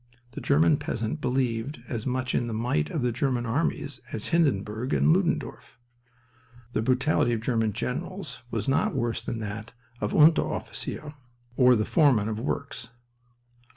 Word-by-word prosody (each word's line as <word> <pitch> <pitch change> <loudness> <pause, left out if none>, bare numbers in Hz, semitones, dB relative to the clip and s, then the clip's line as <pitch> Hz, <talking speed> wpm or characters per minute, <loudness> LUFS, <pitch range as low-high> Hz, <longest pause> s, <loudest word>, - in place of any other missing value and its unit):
The - - -7
German 80 +1 +4
peasant 75 - -3
believed 125 +2 -1
as 115 -1 -4
much 130 0 -1
in 120 - +1
the 115 - -3
might 110 -10 0
of 150 - -2
the 125 - +2
German 125 0 0
armies 135 +1 -1
as 110 - -3
Hindenburg 125 - +1
and 160 - +4
Ludendorff. 180 -8 -1 0.9
The 110 - 0
brutality 130 +1 +2
of 110 - -1
German 115 -2 +1
generals 155 - -4
was - - -3
not 135 +1 +1
worse 120 -3 -1
than 115 - -4
that 110 +1 -6 0.3
of 105 - -1
the - - -1
Unteroffizier 155 -1 +2 0.4
or 125 -1 +6
the 110 -1 +1
foreman 130 - +3
of 110 0 -3
works. 140 -2 -4
125 Hz, 155 wpm, -27 LUFS, 110-140 Hz, 0.9 s, or